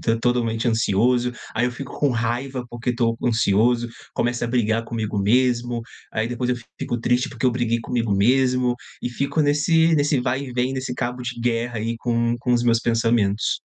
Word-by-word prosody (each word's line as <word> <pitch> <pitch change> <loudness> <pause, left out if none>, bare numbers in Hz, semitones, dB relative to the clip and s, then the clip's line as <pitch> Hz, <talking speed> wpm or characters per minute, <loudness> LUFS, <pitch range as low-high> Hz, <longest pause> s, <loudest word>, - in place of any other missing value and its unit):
tô 115 0 +1
totalmente 115 -1 0
ansioso. 120 +2 +2 0.2
Aí 120 +2 +2
eu - - -1
fico 125 +2 -8
com 145 - +3
raiva 120 +2 -2
porque 120 +1 -2
tô 115 -1 +1
ansioso, 115 +1 +2 0.3
começo 120 0 -1
a - - 0
brigar 115 -2 +1
comigo 110 -3 -3
mesmo. 120 +2 +2 0.3
Aí, 110 +1 -1
depois, 120 +1 -3
eu 125 - +1 0.2
fico 120 - -2
triste 125 +4 +1
porque 120 -1 -6
eu 130 - +5
briguei 115 -1 0
comigo 115 -3 -1
mesmo. 125 +3 +3 0.3
E 125 - -2
fico 140 +5 0
nesse 160 +3 +3
nesse 145 -2 +2
vai 130 +2 -1
e 130 - -8
vem, 125 +1 0
nesse 130 -1 -3
cabo 125 0 -3
de 125 0 -5
guerra 120 0 -1
aí 115 +2 -2
com 120 0 0
com 125 +1 0
os 120 - +2
meus 115 -1 +3
pensamentos. 115 -3 +1
120 Hz, 190 wpm, -22 LUFS, 115-125 Hz, 0.3 s, eu